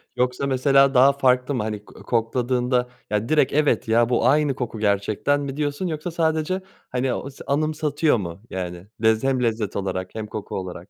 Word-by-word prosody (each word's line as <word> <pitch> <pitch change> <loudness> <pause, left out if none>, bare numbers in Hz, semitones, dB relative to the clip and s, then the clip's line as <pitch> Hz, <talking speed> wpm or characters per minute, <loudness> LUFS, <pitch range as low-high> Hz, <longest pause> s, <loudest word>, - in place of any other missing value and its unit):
Yoksa, 125 +2 0
mesela, 135 +1 +4
daha 135 +2 +6
farklı 130 0 +2
mı? 105 - -1
Hani, 105 -1 -5
ko - - -15
kokladığında 125 +1 0 0.2
ya 105 +2 -1
direkt, 150 -4 +3
"Evet 150 -5 +2
ya, 115 +1 +3
bu 120 0 +2
aynı 145 -1 +3
koku 120 -4 -4
gerçekten." 105 +7 +1
mi 140 -1 -5
diyorsun, 150 +4 -1
yoksa 160 +2 -4
sadece, 160 +3 0 0.3
hani, 125 0 -1
anıs 140 0 -7
anımsatıyor 150 0 +1
mu? 90 -2 -6
Yani, 90 0 -5 0.2
lez 110 +1 +3
hem 130 -2 +1
lezzet 110 -3 -1
olarak 95 -1 -3
hem 110 -1 -4
koku 105 -1 -6
olarak. 95 0 -6
125 Hz, 175 wpm, -23 LUFS, 110-145 Hz, 0.3 s, daha